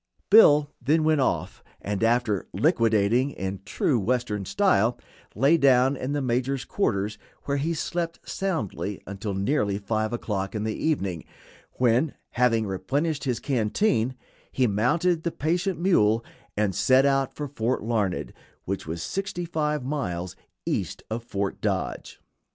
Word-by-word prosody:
Bill 150 Hz, -9 st, +7 dB
then 155 Hz, +3 st, +2 dB
went 155 Hz, -2 st, +3 dB
off, 130 Hz, -, -1 dB, 0.2 s
and, 105 Hz, +1 st, -3 dB
after 115 Hz, -4 st, +1 dB
"liquidating" 115 Hz, -, +2 dB
in 95 Hz, -6 st, -5 dB
true 125 Hz, +5 st, +1 dB
Western 110 Hz, -2 st, -1 dB
style, 125 Hz, -, +2 dB, 0.4 s
lay 145 Hz, +5 st, +4 dB
down 135 Hz, -2 st, +4 dB
in 130 Hz, +1 st, -3 dB
the 145 Hz, -1 st, -1 dB
major's 130 Hz, +2 st, -1 dB
quarters, 105 Hz, -, -1 dB, 0.2 s
where 140 Hz, 0 st, -1 dB
he 160 Hz, +4 st, -1 dB
slept 165 Hz, +1 st, -3 dB
soundly 105 Hz, -, -3 dB
until 100 Hz, +1 st, -5 dB
nearly 100 Hz, -1 st, 0 dB
5 110 Hz, +1 st, -1 dB
o'clock 100 Hz, -4 st, -3 dB
in 105 Hz, -, -2 dB
the 110 Hz, 0 st, -1 dB
evening, 100 Hz, -, -1 dB, 0.5 s
when, 125 Hz, +4 st, +2 dB, 0.2 s
having 115 Hz, -2 st, +2 dB
replenished 140 Hz, -, -2 dB
his 125 Hz, -3 st, -1 dB
canteen, 125 Hz, -, +1 dB, 0.4 s
he 130 Hz, -, +2 dB
mounted 155 Hz, -, +1 dB
the 170 Hz, -, -1 dB
patient 175 Hz, +4 st, -1 dB
mule 115 Hz, -, +3 dB, 0.3 s
and 105 Hz, -2 st, +1 dB
set 130 Hz, +8 st, +4 dB
out 135 Hz, -1 st, +1 dB
for 150 Hz, -, -4 dB
Fort 125 Hz, -4 st, -2 dB
Larned, 105 Hz, -5 st, -1 dB, 0.3 s
which 95 Hz, -1 st, -4 dB
was 85 Hz, +1 st, -4 dB
sixty 190 Hz, -, -3 dB
five 150 Hz, -4 st, -1 dB
miles 90 Hz, -, -3 dB, 0.3 s
east -, -, -2 dB
of 115 Hz, +1 st, -3 dB
Fort 100 Hz, -4 st, -3 dB
Dodge. -, -, -3 dB
125 Hz, 140 wpm, -26 LUFS, 105-150 Hz, 0.5 s, Bill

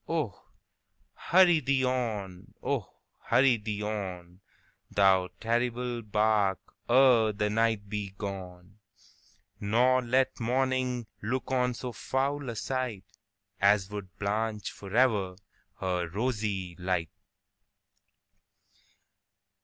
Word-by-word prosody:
Oh! 150 Hz, -, -3 dB, 0.7 s
hurry 175 Hz, -2 st, +4 dB
thee 135 Hz, -2 st, +1 dB
on,—oh! 110 Hz, -8 st, -3 dB, 0.3 s
hurry 125 Hz, 0 st, +4 dB
thee 105 Hz, -1 st, -4 dB
on, 95 Hz, -4 st, -5 dB, 0.5 s
Thou 95 Hz, -2 st, +4 dB
terrible 120 Hz, +1 st, -1 dB
bark, 105 Hz, -2 st, +2 dB, 0.3 s
ere 120 Hz, -3 st, +5 dB
the 105 Hz, +1 st, -1 dB
night 110 Hz, -2 st, +1 dB
be 105 Hz, -1 st, -3 dB
gone, 95 Hz, -1 st, -7 dB, 0.8 s
Nor 125 Hz, +5 st, +3 dB
let 130 Hz, +2 st, +1 dB
morning 125 Hz, 0 st, 0 dB, 0.2 s
look 125 Hz, +5 st, -3 dB
on 125 Hz, -1 st, +1 dB
so 125 Hz, +1 st, -5 dB
foul 135 Hz, +3 st, -2 dB
a 115 Hz, -, -4 dB
sightAs 105 Hz, -4 st, -2 dB
would 100 Hz, -3 st, -7 dB
blanch 105 Hz, +1 st, -2 dB
forever 100 Hz, -3 st, +1 dB, 0.4 s
her 90 Hz, -2 st, -1 dB
rosy 105 Hz, -4 st, -2 dB
light! 90 Hz, -3 st, -1 dB
110 Hz, 90 wpm, -29 LUFS, 100-125 Hz, 0.8 s, ere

